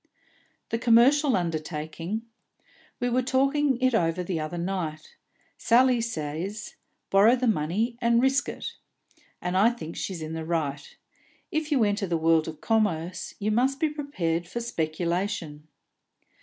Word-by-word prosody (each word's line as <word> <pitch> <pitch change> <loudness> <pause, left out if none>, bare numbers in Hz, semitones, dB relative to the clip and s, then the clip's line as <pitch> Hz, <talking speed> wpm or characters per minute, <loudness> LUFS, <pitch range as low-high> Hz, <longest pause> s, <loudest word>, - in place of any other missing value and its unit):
"The 230 - -1
commercial 250 +5 +5
undertaking? 165 +4 -3 0.8
We 245 - 0
were 245 +1 +2
talking 270 +1 +1
it 255 -1 +3
over 175 -3 +1
the 175 -2 -2
other 155 +3 -4
night. 170 -4 -4 0.4
Sally 245 +1 +4
says: 185 0 -4 0.4
Borrow 205 +5 +6
the 255 0 -1
money 220 +5 0
and 235 0 +4
risk 265 +2 +2
ut. - - -6 0.7
And 180 +1 -1
I 200 +5 +5
think 230 -9 -7
she's 180 -5 -4
in 155 +1 -5
the 160 0 -4
right. 150 -4 -3 0.5
If 310 0 -2
you 265 -6 +4
enter 205 -1 0
the 170 -1 0
world 160 0 +3
of 155 -1 -7
commerce, 190 -7 -1
you 210 +1 -1
must 260 +5 +1
be 315 - +2
prepared 175 - -2
for 235 - -4
speculation. 170 -5 -2
195 Hz, 145 wpm, -26 LUFS, 165-240 Hz, 0.8 s, Borrow